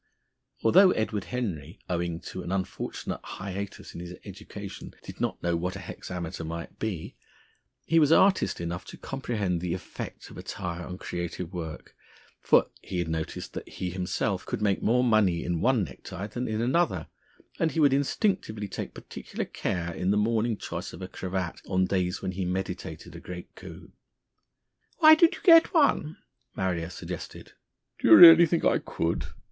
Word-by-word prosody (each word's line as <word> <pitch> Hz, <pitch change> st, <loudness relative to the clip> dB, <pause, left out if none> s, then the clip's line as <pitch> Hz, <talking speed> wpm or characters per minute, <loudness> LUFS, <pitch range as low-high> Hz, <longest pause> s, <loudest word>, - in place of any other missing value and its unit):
Although 185 Hz, -, +7 dB
Edward 105 Hz, -3 st, -2 dB
Henry, 90 Hz, -, -4 dB
owing 85 Hz, -1 st, -2 dB
to 95 Hz, -, -7 dB
an 85 Hz, -, -6 dB
unfortunate 95 Hz, -1 st, -3 dB
hiatus 100 Hz, +1 st, -6 dB
in -, -, -7 dB
his 90 Hz, +1 st, -7 dB
education, 100 Hz, 0 st, -9 dB
did -, -, -9 dB
not -, -, -2 dB
know 85 Hz, 0 st, +1 dB
what 90 Hz, +2 st, -2 dB
a -, -, -6 dB
hexameter 90 Hz, -1 st, -6 dB
might 85 Hz, +1 st, -7 dB
be, 95 Hz, -, -4 dB, 0.7 s
he 165 Hz, -, +4 dB
was 150 Hz, -1 st, +4 dB
artist 190 Hz, +3 st, +4 dB
enough 85 Hz, +1 st, -4 dB
to -, -, -10 dB
comprehend 105 Hz, -10 st, -2 dB
the 90 Hz, -1 st, -1 dB
effect 95 Hz, -, -8 dB
of -, -, -10 dB
attire 85 Hz, -1 st, -5 dB
on 90 Hz, 0 st, -7 dB
creative 85 Hz, 0 st, -5 dB
work, 80 Hz, -3 st, -7 dB, 0.4 s
for -, -, +3 dB
he 95 Hz, -, -5 dB
had 85 Hz, -2 st, -1 dB
noticed 80 Hz, -1 st, -4 dB
that -, -, -7 dB
he 90 Hz, -1 st, -4 dB
himself 90 Hz, 0 st, -2 dB
could -, -, -4 dB
make 100 Hz, -2 st, +1 dB
more 125 Hz, +3 st, +3 dB
money 110 Hz, -8 st, +3 dB
in 85 Hz, -2 st, -2 dB
one 125 Hz, -5 st, +3 dB
necktie 90 Hz, +3 st, -7 dB
than 120 Hz, +4 st, -4 dB
in 110 Hz, 0 st, -1 dB
another, 160 Hz, +8 st, +1 dB, 0.5 s
and 160 Hz, -, +1 dB
he 165 Hz, -, -1 dB
would 145 Hz, -3 st, +5 dB
instinctively 140 Hz, -, 0 dB
take -, -, -6 dB
particular -, -, -6 dB
care 85 Hz, -2 st, -3 dB
in 90 Hz, +3 st, -2 dB
the 100 Hz, -, +3 dB
morning 110 Hz, +1 st, +1 dB
choice -, -, -6 dB
of 95 Hz, -, -8 dB
a -, -, -4 dB
cravat 95 Hz, -2 st, -4 dB
on 95 Hz, -1 st, +2 dB
days 90 Hz, -1 st, -1 dB
when 95 Hz, -, -1 dB
he 95 Hz, +1 st, -3 dB
meditated 90 Hz, +1 st, -4 dB
a -, -, -7 dB
great 90 Hz, -1 st, -9 dB
coup. -, -, -12 dB, 1.1 s
"Why 310 Hz, -2 st, +9 dB
don't 330 Hz, +1 st, +5 dB
you -, -, -12 dB
get 335 Hz, +1 st, +7 dB
one?" 220 Hz, -, +3 dB, 0.4 s
Marrier 90 Hz, -3 st, -1 dB
suggested. 90 Hz, -, -8 dB, 0.5 s
"Do -, -, +1 dB
you -, -, +10 dB
really 170 Hz, -1 st, +11 dB
think 170 Hz, +1 st, 0 dB
I -, -, +4 dB
could?" 80 Hz, -4 st, -2 dB
95 Hz, 170 wpm, -27 LUFS, 90-120 Hz, 1.1 s, really